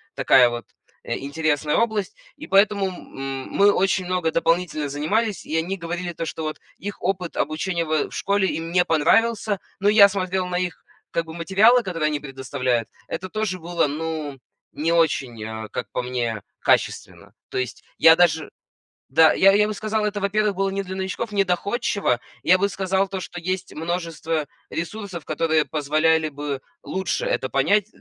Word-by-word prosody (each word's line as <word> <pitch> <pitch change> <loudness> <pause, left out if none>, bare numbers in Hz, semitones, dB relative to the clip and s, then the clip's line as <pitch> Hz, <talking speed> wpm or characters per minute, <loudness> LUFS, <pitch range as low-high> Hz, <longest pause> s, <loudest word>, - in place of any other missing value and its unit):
такая 125 -2 +5
вот, 120 0 -5 0.4
э, 115 - -3
интересная 150 +1 0
область. 215 -4 0 0.2
И - - -9
поэтому 200 0 +3
м 180 -6 -10
м 135 -1 -4
мы 205 +1 +5
очень 190 -1 +1
много 180 -3 0
дополнительно 165 -2 0
занимались, 200 +9 -1
и 160 - -1
они 185 +4 -1
говорили 175 0 -4
то, 165 - -4
что 160 0 -5
вот 155 0 -4 0.2
их 205 +1 -7
опыт 180 -2 -2
обучения 170 +2 -1
в 155 -1 0
в - - -23
школе 200 -1 +1
им 165 +1 -4
не 180 0 +3
понравился. 205 +6 +2 0.2
Но 200 +1 +3
я 205 -1 +8
смотрел 185 -1 -1
на 180 0 -1
их 180 -2 -4 0.3
как 165 - -1
бы 160 - -9
материалы, 200 +9 +4
которые 165 -7 -1
они 150 -1 -2
предоставляют. 130 -4 -2 0.2
Это 185 +2 -5
тоже 215 -3 -2
было, 170 -2 0
ну, 155 -1 -4 0.4
не 160 +3 -1
очень, 135 -9 +1
э, 110 0 -6
как 125 - -4
по 125 - -2
мне, 120 -4 -2 0.2
качественно. - - 0 0.2
То - - -4
есть 130 -2 -3
я 160 0 +8
даже 160 -3 +2 0.6
да, 160 +3 +6
я 195 +1 +6
я 210 +1 +4
бы - - -2
сказал, 215 +1 -1
это, 205 -1 -1
во-первых, 205 +1 +1
было 195 +1 0
не 195 +1 -2
для 190 0 -6
новичков, 190 +3 -4
не 200 - +3
доходчиво. 185 - 0 0.2
Я 185 +2 +5
бы 200 +1 +2
сказал 190 0 0
то, 190 -1 -4
что 175 -1 -7
есть 185 +2 -3
множество 165 -2 -2 0.2
ресурсов, 180 0 -5
которые 160 -2 +1
позволяли 155 +1 +1
бы 145 -2 -4 0.2
лучше 190 - -2
это - - -1
понять 205 -1 +2
175 Hz, 175 wpm, -23 LUFS, 155-195 Hz, 0.6 s, я